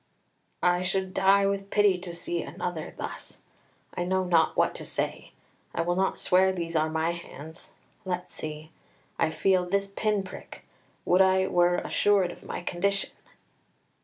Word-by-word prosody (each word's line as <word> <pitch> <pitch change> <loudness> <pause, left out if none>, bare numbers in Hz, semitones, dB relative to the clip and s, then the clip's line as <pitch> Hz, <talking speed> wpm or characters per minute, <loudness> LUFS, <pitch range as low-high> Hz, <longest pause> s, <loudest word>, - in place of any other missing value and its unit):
"I 180 0 +3
should 190 0 -1
die 195 +1 +4
with 195 0 -1
pity 205 -3 +3
to 175 -1 -6
see 345 - -2
another - - -5
thus. - - -7 0.5
I 175 - -2
know 190 +1 +1
not 170 -3 +2
what - - +3
to - - -6
say. - - -3 0.4
I - - +1
will 175 +1 0
not 190 +1 +1
swear 190 +1 +4
these 170 -2 -4
are 155 0 +2
my 160 +1 0
hands; 160 -1 -9 0.3
let's 180 -2 -4
see. 155 0 -7 0.5
I 165 - +3
feel 185 +2 +2
this 200 +2 0
pin 200 0 -1
prick. 185 - -11 0.4
Would 180 +2 +4
I 190 0 +4
were 175 -1 +3
assured 195 0 +2
of - - -13
my - - -5
condition!" 195 +3 0
185 Hz, 160 wpm, -27 LUFS, 175-195 Hz, 0.5 s, die